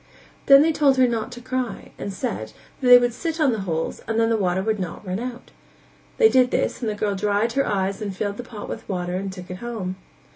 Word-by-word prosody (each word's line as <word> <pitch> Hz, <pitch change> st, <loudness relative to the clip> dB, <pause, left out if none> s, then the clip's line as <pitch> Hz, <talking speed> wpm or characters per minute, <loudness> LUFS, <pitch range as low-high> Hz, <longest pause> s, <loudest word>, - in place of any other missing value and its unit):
Then 275 Hz, +1 st, +9 dB
they 325 Hz, -, +3 dB
told 285 Hz, -3 st, +3 dB
her 255 Hz, -1 st, +5 dB
not 230 Hz, 0 st, -2 dB
to 245 Hz, -, -9 dB
cry, 255 Hz, -1 st, -4 dB
and 200 Hz, -, -4 dB
said, 110 Hz, -, -4 dB, 0.3 s
that 255 Hz, -, -1 dB
they 245 Hz, 0 st, +11 dB
would 245 Hz, -1 st, +1 dB
sit 330 Hz, +5 st, -4 dB
on 295 Hz, -4 st, +4 dB
the 225 Hz, -, -2 dB
holes 160 Hz, 0 st, -2 dB
and 225 Hz, 0 st, 0 dB
then 225 Hz, 0 st, +3 dB
the -, -, +3 dB
water 190 Hz, -2 st, 0 dB
would 215 Hz, 0 st, 0 dB
not 185 Hz, +2 st, -5 dB
run 185 Hz, +1 st, -3 dB
out; 245 Hz, 0 st, -7 dB, 0.7 s
they 450 Hz, -, +7 dB
did 255 Hz, -, +4 dB
this -, -, -1 dB
and 230 Hz, -, -1 dB
the 210 Hz, -, -2 dB
girl 205 Hz, -1 st, -1 dB
dried 205 Hz, +3 st, 0 dB
her 275 Hz, +1 st, +1 dB
eyes 195 Hz, 0 st, -1 dB
and 200 Hz, -3 st, -4 dB
filled 205 Hz, 0 st, -2 dB
the 245 Hz, -, -5 dB
pot 215 Hz, -4 st, -8 dB
with -, -, -7 dB
water 180 Hz, -2 st, -2 dB
and 190 Hz, +1 st, -3 dB
took 180 Hz, -1 st, -9 dB
it 180 Hz, -, -5 dB
home. 205 Hz, -5 st, -5 dB
220 Hz, 250 wpm, -23 LUFS, 190-250 Hz, 0.7 s, they